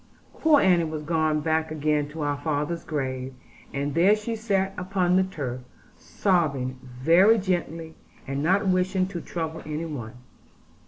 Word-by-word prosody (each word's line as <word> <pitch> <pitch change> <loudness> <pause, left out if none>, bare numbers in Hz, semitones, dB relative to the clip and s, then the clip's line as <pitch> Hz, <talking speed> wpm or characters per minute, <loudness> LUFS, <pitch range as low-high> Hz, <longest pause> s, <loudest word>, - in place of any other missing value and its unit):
Poor 310 -2 +5
Annie 175 -6 +4
was 155 -1 -5
gone 155 -1 +1
back 160 +1 0
again 150 -1 0
to 155 0 -5
our 145 -1 0
father's 155 +2 -2
grave, 130 -3 -3 0.4
and 140 +1 -2
there 185 +6 +5
she 215 +2 -4
sat 195 -3 0
upon 180 -1 0
the 190 - +5
turf, 135 -9 -5 0.3
sobbing 140 -9 0
very 165 - +4
gently, 170 -4 -2 0.3
and 135 +1 -3
not 190 +6 +2
wishing 185 0 +2
to 185 -3 -6
trouble 160 -1 -4
any 155 +2 -4
one. 125 -9 -6
160 Hz, 150 wpm, -25 LUFS, 145-185 Hz, 0.4 s, Poor